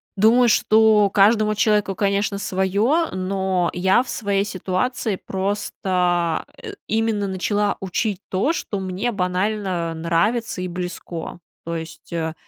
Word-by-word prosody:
думаю, 230 Hz, +5 st, +5 dB
что 215 Hz, -1 st, +4 dB
каждому 215 Hz, +2 st, +4 dB
человеку, 210 Hz, -2 st, +2 dB
конечно, 200 Hz, 0 st, 0 dB
свое, 205 Hz, -, +1 dB
но 185 Hz, -1 st, -1 dB
я 190 Hz, +5 st, +3 dB
в -, -, -12 dB
своей 200 Hz, -2 st, 0 dB
ситуации 195 Hz, +3 st, -2 dB
просто, 180 Hz, -4 st, -1 dB, 0.2 s
э, 440 Hz, -3 st, -7 dB
именно 220 Hz, -2 st, 0 dB
начала 205 Hz, +2 st, 0 dB
учить 195 Hz, +1 st, -2 dB
то, 205 Hz, -, +1 dB
что 205 Hz, -10 st, -4 dB
мне 190 Hz, +5 st, -2 dB
банально 185 Hz, -3 st, -1 dB
нравится 180 Hz, +7 st, 0 dB
и 185 Hz, -, -2 dB
близко, 175 Hz, -1 st, -6 dB, 0.3 s
то 170 Hz, 0 st, -3 dB
есть, 160 Hz, +1 st, -8 dB
э, 160 Hz, -1 st, -2 dB
195 Hz, 125 wpm, -22 LUFS, 180-215 Hz, 0.3 s, думаю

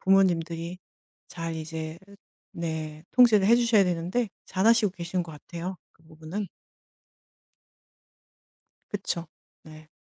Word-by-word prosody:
부모님들이 175 Hz, -2 st, +2 dB, 0.5 s
잘 165 Hz, -1 st, -4 dB
이제 160 Hz, 0 st, -5 dB, 0.5 s
네. 160 Hz, -2 st, -4 dB
통제를 225 Hz, -6 st, +6 dB
해 235 Hz, +2 st, +7 dB
주셔야 230 Hz, -4 st, +5 dB
되는데 180 Hz, +6 st, 0 dB, 0.2 s
잘하시고 215 Hz, +2 st, +4 dB
계신 180 Hz, 0 st, -2 dB
것 165 Hz, -2 st, -9 dB
같아요 170 Hz, +4 st, -6 dB
그 165 Hz, -, -29 dB
부분은. 160 Hz, +5 st, -6 dB, 2.5 s
그쵸. 185 Hz, -4 st, -3 dB, 0.4 s
네. 155 Hz, 0 st, -13 dB
170 Hz, 215 characters per minute, -27 LUFS, 160-195 Hz, 2.5 s, 해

